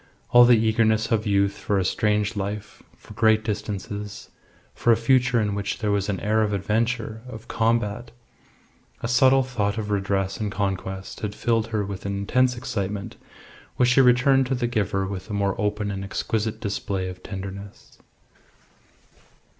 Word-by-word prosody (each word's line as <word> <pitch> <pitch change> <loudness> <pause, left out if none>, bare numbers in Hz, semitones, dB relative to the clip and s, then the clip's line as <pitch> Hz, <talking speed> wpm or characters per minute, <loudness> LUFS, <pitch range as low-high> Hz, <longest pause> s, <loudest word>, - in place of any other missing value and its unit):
All 120 0 +8
the 120 -1 +6
eagerness 110 0 +2
of 110 -1 +1
youth 100 0 +2
for 100 - 0
a 95 - +1
strange 105 +2 +1
life, 100 +1 -5 0.2
for - - -14
great 110 -1 +3
distances, 105 -1 -5 0.4
for 120 - +2
a 115 - +5
future 125 +1 +3
in 105 -2 0
which 100 -1 -3
there 105 -2 -1
was 100 0 0
an 95 -3 -1
air 110 +1 +2
of 105 -1 0
adventure, 110 +2 -1
of 110 -3 -10
combat 115 -1 0 0.9
a - - 0
subtle 130 +2 +4
thought 110 -5 -2
of 105 -1 -3
redress 95 -1 -1
and 105 -2 -2
conquest, 95 -1 -3
had 105 -1 -4
filled 115 -2 0
her 110 -3 -1
with 100 0 -6
an 100 0 -2
intense 125 +5 +1
excitement, 105 -5 -4 0.6
which 125 -1 +3
she 125 +2 +5
returned 130 +1 +4
to 130 - 0
the 120 -1 -1
giver 100 -5 0
with 95 +1 -6
a - - -4
more 100 -1 +1
open 105 0 -1
and 95 0 -4
exquisite 110 +2 -2
display 100 -3 -3
of 90 0 -8
tenderness. 100 0 -9
105 Hz, 165 wpm, -24 LUFS, 100-115 Hz, 0.9 s, All